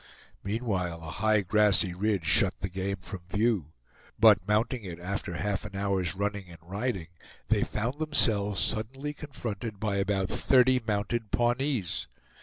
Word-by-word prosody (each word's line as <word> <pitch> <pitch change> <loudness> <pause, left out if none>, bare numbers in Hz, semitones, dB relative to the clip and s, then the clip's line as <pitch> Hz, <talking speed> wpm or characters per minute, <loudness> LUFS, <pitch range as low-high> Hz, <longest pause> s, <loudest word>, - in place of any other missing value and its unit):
Meanwhile 100 -6 -2
a 80 - -7
high 105 +6 +2
grassy 100 -1 +4
ridge 100 -1 -1
shut 70 - +4
the 95 - -2
game 95 +1 -2
from 95 +1 -7
view; 105 -7 0 0.4
but 95 - +5
mounting 115 +3 +1
it 85 -3 -7
after 90 0 -4
half 100 +2 -2
an 105 -2 -9
hour's 95 -2 -1
running 100 -1 -3
and 85 - -11
riding, 95 -1 -3 0.4
they - - +3
found 125 +7 -3
themselves 105 - +2
suddenly 135 - -1
confronted 115 -8 -6
by 105 -2 -1
about 95 -1 0
thirty 130 -1 +3
mounted 105 +2 -1
Pawnees! 120 - 0
100 Hz, 145 wpm, -28 LUFS, 95-115 Hz, 0.4 s, but